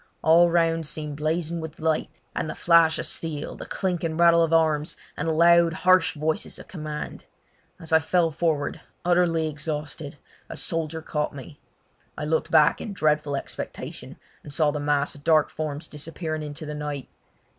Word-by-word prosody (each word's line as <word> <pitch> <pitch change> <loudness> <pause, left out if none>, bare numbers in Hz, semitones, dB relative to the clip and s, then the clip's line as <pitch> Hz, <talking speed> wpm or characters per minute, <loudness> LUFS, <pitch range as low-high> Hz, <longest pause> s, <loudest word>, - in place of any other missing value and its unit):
All 170 +2 +6
around 165 -2 +1
seemed 150 -1 -4
blazing 165 +2 -1
with 160 0 -8
light, 160 -1 0 0.3
and 155 - -2
the - - -5
flash 170 -1 +5
of - - -2
steel, 155 -3 -4
the - - -9
clink 180 -3 -2
and 160 0 -2
rattle 170 -1 +6
of 165 -1 +2
arms, 155 -2 +2 0.2
and 150 - -3
the - - +2
loud, 170 +1 +5
harsh 185 0 +3
voices 155 +1 -2
of - - -11
command. 155 -4 -6 0.5
As 160 -1 -5
I 160 - +7
fell 165 +1 +2
forward, 155 -2 -1 0.2
utterly 175 -2 +3
exhausted, 150 -1 -5 0.3
a - - -6
soldier 160 -1 -2
caught 150 -2 -2
me. 145 +2 -10 0.6
I - - -3
looked 160 +1 0
back 155 -1 +4
in 210 - -5
dreadful 150 -4 +1
expectation, 135 - -7 0.2
and 145 - -11
saw 150 +1 +2
the 150 - -3
mass 145 -1 +1
of 145 - -12
dark 155 -1 +4
forms 155 0 -4
disappearing 155 +1 -5
into 150 +1 -6
the 150 - -5
night. 150 -3 -5
160 Hz, 175 wpm, -25 LUFS, 150-165 Hz, 0.6 s, I